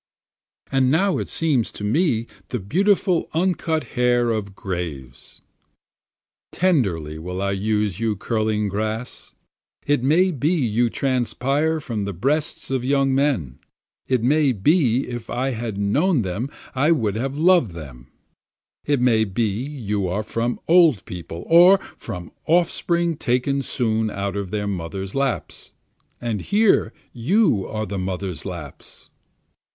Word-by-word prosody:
And 135 -1 +3
now 185 +7 +2
it - - -4
seems 145 -8 +1
to - - -8
me 115 - +1 0.2
the 125 - -2
beautiful 180 - +1
uncut 165 -2 0
hair 120 -1 +2
of 100 -3 -3
graves. 80 -11 -5 1.1
Tenderly 95 - 0
will 90 +3 -5
I 100 0 0
use 105 -1 -1
you 110 -2 0
curling 110 0 -1
grass, 110 +4 -4 0.5
It 145 -3 +2
may 170 +8 +3
be 155 +3 0
you 120 -5 +1
transpire 135 +5 0
from 115 -9 -4
the 100 - -4
breasts 140 - -1
of 130 -2 0
young 135 0 +2
men, 125 - 0 0.5
It 130 -3 +1
may 145 +1 +3
be 130 - +2
if 120 -2 -6
I 130 +2 -1
had 115 -3 -4
known 130 - +2
them 100 +8 -3 0.2
I 140 +5 +2
would 115 -11 +1
have 135 +6 -3
loved 170 - +4
them, 65 -6 -10 0.8
It 145 -2 +1
may 120 -3 +3
be 110 +2 0
you 105 -4 -3
are 95 +5 -2
from 115 +2 -2
old 165 - +5
people, 85 -1 -7
or 175 +4 +7 0.2
from 90 -6 -7 0.2
offspring 170 0 +1
taken 135 +2 0
soon 110 -4 0
out 100 -1 -3
of 100 -2 -3
their 105 +1 -2
mothers' 95 0 -4
laps, 135 -2 -3 0.5
And 115 -4 -2
here 205 - +3 0.2
you 125 - +2
are 110 0 -3
the 100 -1 -4
mothers' 95 -1 -4
laps. 80 -6 -9
120 Hz, 135 wpm, -22 LUFS, 100-145 Hz, 1.1 s, or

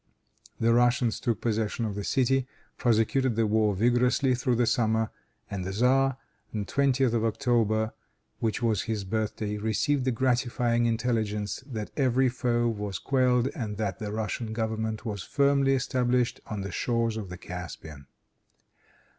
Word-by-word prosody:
The 115 0 +3
Russians 120 -1 +2
took 115 -2 -1
possession 110 0 -1
of 105 - -3
the 100 0 -4
city, 130 +3 +1 0.3
prosecuted 120 +2 +2
the 115 0 +2
war 105 -1 +2
vigorously 125 +5 +3
through 125 0 +1
the 120 +1 +2
summer, 110 -1 +1 0.4
and 100 -2 -4
the 90 - -4
tzar, 130 +4 +3 0.3
on 110 - -2
the - - -4
20th 135 -2 +2
of 115 -2 +1
October, 110 -1 +1 0.5
which 115 +1 -1
was 110 -4 +2
his 110 -3 -1
birthday, 105 +1 -2
received 110 +6 +1
the 130 - +2
gratifying 120 -1 +1
intelligence 110 -2 -1
that 110 -6 -5
every 130 -1 +3
foe 120 -1 0
was 105 -4 -3
quelled, 130 -1 +2
and 110 -9 -5
that 100 -3 -2
the 105 -2 -4
Russian 110 +1 -3
government 110 0 -2
was 105 -4 -3
firmly 140 +3 +2
established 125 -1 0
on 105 -2 -4
the 95 0 -5
shores 115 +2 0
of 105 -4 -5
the 90 - -7
Caspian. 80 -6 -8
115 Hz, 155 wpm, -27 LUFS, 110-125 Hz, 0.5 s, The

